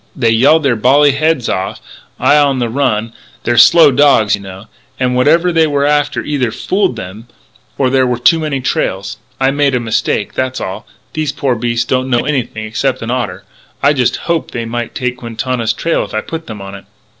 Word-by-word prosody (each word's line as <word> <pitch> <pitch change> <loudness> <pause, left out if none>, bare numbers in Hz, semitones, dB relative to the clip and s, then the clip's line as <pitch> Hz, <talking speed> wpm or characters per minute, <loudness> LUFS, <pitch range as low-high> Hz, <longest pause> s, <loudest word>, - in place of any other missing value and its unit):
They 115 -4 +1
yelled 140 +8 +4
their 135 -4 +2
bally 140 +6 +4
heads 150 -3 0
off 95 +1 -3 0.4
I 145 - +4
on 145 -2 +3
the 120 -2 -1
run 115 -3 -1 0.3
they're 120 - 0
slow 145 +6 +7
dogs, 135 -6 +3
you - - -1
know 95 +1 -10 0.3
and 125 -1 0
whatever 165 +8 +3
they 165 -1 +3
were 145 -1 0
after 145 0 0
either 140 -5 -1
fooled 190 - -1
them 105 +3 -9 0.5
or 130 -2 +1
there 130 -1 +2
were 125 -1 -1
too 165 +7 +3
many 150 -4 -2
trails.... 95 -5 -2 0.2
I 135 0 +2
made 140 -1 +1
a - - +1
mistake, 115 -2 -1
that's 130 0 -2
all. 95 - -6 0.3
These 155 -2 -2
poor 135 -3 0
beasts 120 0 -1
don't 130 +1 -1
know 120 -2 +1
anything 120 -6 -2
except 125 +3 -2
an 115 - -3
otter. 125 -1 -3 0.4
I 140 +1 +5
just 125 -4 +1
hoped 170 -1 -3
they 115 -1 -3
might 120 0 -5
take 125 -1 -2
Quintana's 115 -1 -2
trail 165 +8 -1
if - - -8
I - - 0
put 165 0 -7
them 105 -3 -8
on 95 0 -9
it." 100 - -11
130 Hz, 200 wpm, -14 LUFS, 115-145 Hz, 0.5 s, slow